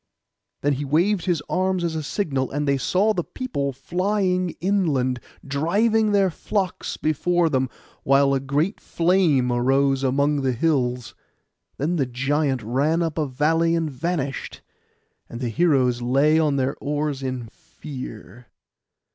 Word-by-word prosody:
Then 145 0 +2
he 140 +2 -3
waved 170 +7 +1
his 170 -5 0
arms 185 0 0
again 170 - +1
as 160 - -6
a 160 - -2
signal, 140 -5 -2
and 145 +1 -2
they 140 -1 +2
saw 200 +9 +2
the 175 - -1
people 145 - -3
flying 180 +5 -1
inland, 155 -10 +1 0.3
driving 210 +10 +1
their 195 -2 +3
flocks 190 +2 -3
before 165 +3 +1
them, 130 -2 +1 0.3
while 140 0 +3
a 135 - +2
great 145 +9 -1
flame 165 -8 +2
arose 135 +2 +2
among 140 +2 +1
the 130 -1 0
hills. 125 -3 0 0.6
Then 165 +6 -1
the 135 -4 +1
giant 135 +1 0
ran 145 +9 +1
up 165 -1 -2
a 150 - 0
valley 160 +5 +1
and 165 -2 -1
vanished, 140 0 -3 0.7
and 120 - -7
the 125 -2 -2
heroes 125 -3 +2
lay 140 +6 +3
on 150 -3 +2
their 135 0 0
oars 145 -1 -2
in 130 -2 -3
fear. 125 -4 -10
145 Hz, 145 wpm, -23 LUFS, 135-175 Hz, 0.7 s, their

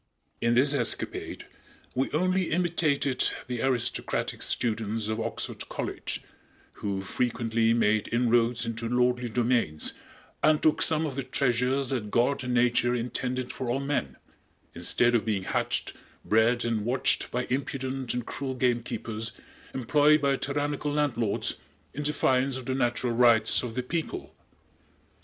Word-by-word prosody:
In 115 0 +2
this 140 +4 +5
escapade 120 -5 -2 0.5
we 130 +2 0
only 185 +3 +1
imitated 155 -6 +1 0.2
the 125 -2 -4
aristocratic 125 -2 -1
students 110 -2 -1
of 110 +1 -2
Oxford - - -4
College, - - -4 0.5
who 100 -2 -3
frequently 115 +1 0
made 110 -2 +2
inroads 120 0 +2
into 115 0 -3
lordly 125 0 +1
domains 115 -10 +1 0.5
and 155 -1 +4
took 155 - +2
some 160 0 +4
of 140 -4 -4
the 135 - -1
treasures 130 0 +1
that 120 -6 -2
God 125 +5 +1
and 125 -1 -1
Nature 120 0 +3
intended 125 +1 -3
for 130 - -4
all 125 +3 0
men, 140 - -2 0.6
instead 120 0 +2
of 115 - +3
being 105 -4 -1
hatched, - - -1 0.3
bred 115 +3 +3
and 115 -3 0
watched 125 +4 +1
by 125 +1 -1
impudent 130 -1 -2
and 125 -1 -3
cruel 135 -1 -4
gamekeepers, 120 -2 -1 0.4
employed 145 +4 +3
by 140 -1 +2
tyrannical 145 +1 -2
landlords, 130 -8 0 0.3
in 150 - -4
defiance 135 -3 +1
of 130 - -8
the 130 - -1
natural 120 -1 0
rights 115 -2 +5
of 120 -2 -6
the 125 - -1
people. 165 +5 -4
125 Hz, 140 wpm, -27 LUFS, 115-135 Hz, 0.6 s, this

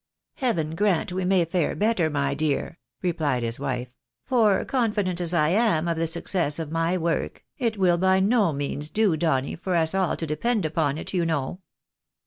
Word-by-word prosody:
" - - -65
Heaven 170 - -1
grant 190 -1 +1
we 185 0 -2
may 185 -2 +3
fare 170 -1 -1
better, 205 -6 +1
my 140 -2 0
dear! 155 +2 -2
". 120 +1 -57
replied 155 -8 0
his 115 +1 -3
wife; 130 -3 -3 0.2
" 120 - -58
for 220 -6 +3
confident 210 -8 0
as 170 -1 -2
I 155 -3 +2
am 185 -4 +2
of 170 - 0
the 165 0 -1
success 165 -2 0
of 160 -2 -5
my 165 +2 0
work, 170 -1 -2
it 230 -4 -1
will 180 -3 +3
by 190 +1 +3
no 205 -2 +3
means 145 +1 -2
do, 210 -4 +2
Donny, 150 -4 0
for 180 +1 -3
us 160 0 +2
all 190 -2 0
to 165 - -3
depend 195 +7 -1
upon 155 -2 0
it, - - -6
you 180 -2 +1
know." 160 0 -2
170 Hz, 200 wpm, -25 LUFS, 150-190 Hz, 0.2 s, may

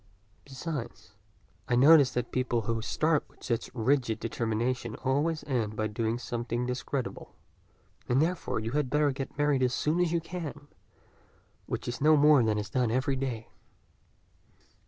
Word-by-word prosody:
Besides, 135 - -6 0.6
I 120 - +2
notice 140 +2 +7
that 125 -1 -2
people 125 -2 0
who 115 +1 -2
start 155 +6 +1
with - - -22
such 115 -2 -2
rigid 125 -1 +1
determinations 115 +1 -2
always 150 +4 +1
end 115 -6 -2
by 110 - -1
doing 110 +2 -1
something 120 0 -3
discreditable, 125 +1 -4 0.7
and 125 +2 +3
therefore 165 -4 0
you 110 +1 -4
had 145 -1 0
better 150 +1 +2
get 135 +1 -6
married 145 -2 +2
as 125 -1 +2
soon 155 +4 0
as 175 -2 +2
you 170 - +2
can, 160 -4 -7 1.0
which - - -4
is 120 +2 -4
no 155 +1 +6
more 150 -1 +6
than 110 -2 +1
is 105 0 -4
done 125 -3 +1
every 130 +4 0
day." 125 -4 -4
130 Hz, 155 wpm, -29 LUFS, 115-145 Hz, 1.0 s, notice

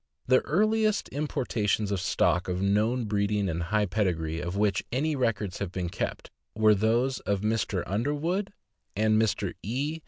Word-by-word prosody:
The 130 0 +5
earliest 215 +5 +2
importations 110 -8 -1
of 100 -3 -1
stock 90 0 +1
of 90 0 -2
known 105 +5 +1
breeding 100 -1 0
and 85 -1 -2
high 105 +5 +1
pedigree, 85 -5 -1
of 90 +2 -4
which 100 -3 +1
any 150 +5 0
records 110 -7 -1
have 100 -3 -3
been 90 -2 -3
kept, - - -4 0.2
were 110 0 +5
those 115 +6 +1
of 100 0 -1
Mr. 105 -4 0
Underwood 150 - -1 0.4
and 110 +1 +3
Mr. 110 -5 0
E. 140 - -2
105 Hz, 155 wpm, -28 LUFS, 95-130 Hz, 0.4 s, The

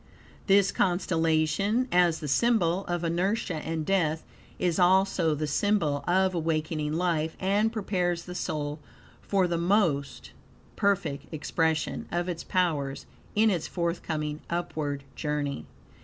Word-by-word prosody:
This 195 0 +5
constellation, 175 +5 +1
as 175 -2 +3
the 150 - -4
symbol 190 - +2
of 175 -1 -2
inertia 180 +4 0
and 160 0 -3
death, 160 -4 +1 0.3
is 175 0 0
also 180 -3 +3
the 155 +1 -2
symbol 150 -3 +1
of 190 +1 +3
awakening 155 -2 -1
life, 165 -2 0
and 205 +4 +2
prepares 180 -5 -1
the 180 - -8
soul 150 -3 -3 0.4
for 195 -2 +1
the 170 -1 -1
more 175 -5 +3 0.7
perfect 200 -8 0
expression 160 0 -1
of 175 +1 -1
its 170 -2 -4
powers 150 -7 -1 0.3
in 215 +1 +4
its 170 -4 -1
forthcoming 160 -3 -2
upward 155 -5 -3
journey. 145 - -3
170 Hz, 125 wpm, -28 LUFS, 155-190 Hz, 0.7 s, This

